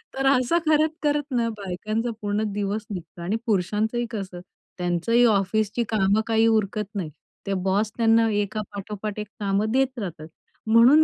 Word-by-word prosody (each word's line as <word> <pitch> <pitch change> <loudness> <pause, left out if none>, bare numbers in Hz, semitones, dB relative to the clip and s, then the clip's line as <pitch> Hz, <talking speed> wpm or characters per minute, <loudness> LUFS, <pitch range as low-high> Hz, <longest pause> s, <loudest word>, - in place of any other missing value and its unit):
तर 270 - -1
असं 270 +5 +3
करत-करत 305 -1 +2
ना, 235 -2 +1
बायकांचा 215 +5 -3
पूर्ण 205 +1 0
दिवस 205 +1 -2
निघतो 175 -2 -7
आणि 185 +5 -1
पुरुषांचंही 220 +3 0
कसं, 190 -5 -5 0.4
त्यांचंही 180 +7 +2
ऑफिसची 215 +2 +1
कामं 210 0 +2
काही 225 0 +3
उरकत 215 -1 +1
नाही. 175 -6 -2 0.4
ते 195 - 0
बॉस 205 +3 +1
त्यांना 225 -1 +4
एका 210 +1 -3
पाठोपाठ 210 +1 -5
एक 210 - -4
कामं 205 +2 0
देत 260 -1 +1
राहतात. 165 -6 -6 0.4
म्हणून 240 +8 +7
215 Hz, 145 wpm, -24 LUFS, 195-235 Hz, 0.4 s, म्हणून